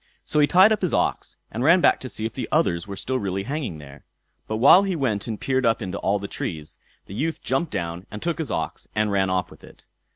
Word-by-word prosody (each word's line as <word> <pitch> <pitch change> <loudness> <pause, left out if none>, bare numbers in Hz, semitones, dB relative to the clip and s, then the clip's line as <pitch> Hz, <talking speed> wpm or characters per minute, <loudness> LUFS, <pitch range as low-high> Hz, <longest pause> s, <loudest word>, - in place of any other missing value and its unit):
So 150 - 0
he 145 - +5
tied 190 +6 +6
up 220 - +1
his 180 - 0
ox, - - -1 0.2
and 120 - -3
ran 170 +6 +6
back - - +4
to 130 - -7
see 110 - -5
if 115 - -3
the 125 -4 -5
others 90 - +1
were 100 - -6
still 130 +6 -2
really 95 -1 -2
hanging 135 - -4
there. 70 -1 -13 0.4
But 110 - -2
while 140 - +7
he 195 -2 -1
went 120 -9 -1
and 110 -2 -4
peered 130 -1 0
up 115 -2 +2
into 100 -3 -4
all 100 +1 +1
the 100 0 -6
trees, 75 -6 -5 0.3
the - - -10
youth 160 +9 -2
jumped 135 +6 -1
down 85 -2 -4
and 105 - -7
took 170 +4 -2
his 160 - -2
ox - - -4
and 110 -1 +1
ran 95 -1 +1
off 90 -1 -1
with - - -16
it. - - -16
110 Hz, 255 wpm, -24 LUFS, 95-150 Hz, 0.4 s, while